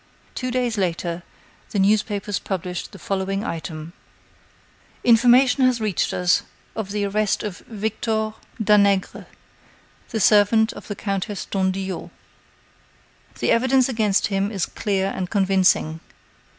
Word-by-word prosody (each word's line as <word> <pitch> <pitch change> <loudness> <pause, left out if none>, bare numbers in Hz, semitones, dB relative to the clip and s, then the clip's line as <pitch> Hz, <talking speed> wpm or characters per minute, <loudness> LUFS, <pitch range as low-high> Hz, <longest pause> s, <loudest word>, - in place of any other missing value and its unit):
Two 255 - -3
days 245 -3 -1
later, 170 -1 -2 0.5
the - - -3
newspapers 205 0 +1
published 180 -2 -4
the - - -11
following 195 +2 -2
item: 160 -1 -6 1.1
"Information 245 +3 +5
has 255 -2 +3
reached 215 -4 0
us 180 0 +2 0.3
of 220 -3 -4
the 205 0 -1
arrest 205 +1 0
of 205 -4 -5
Victor 220 0 -2 0.3
Danègre, 200 -2 +2 0.8
the 225 - -2
servant 215 +2 +4
of - - -11
the 205 - -4
Countess 200 0 -3
d'Andillot. 190 -1 -2 1.3
The - - 0
evidence 260 +2 +3
against 215 -6 +1
him 200 +1 -1
is 195 -5 -1
clear 195 -2 -1
and 185 -1 -3
convincing. 190 -5 +2
200 Hz, 120 wpm, -22 LUFS, 190-220 Hz, 1.3 s, Information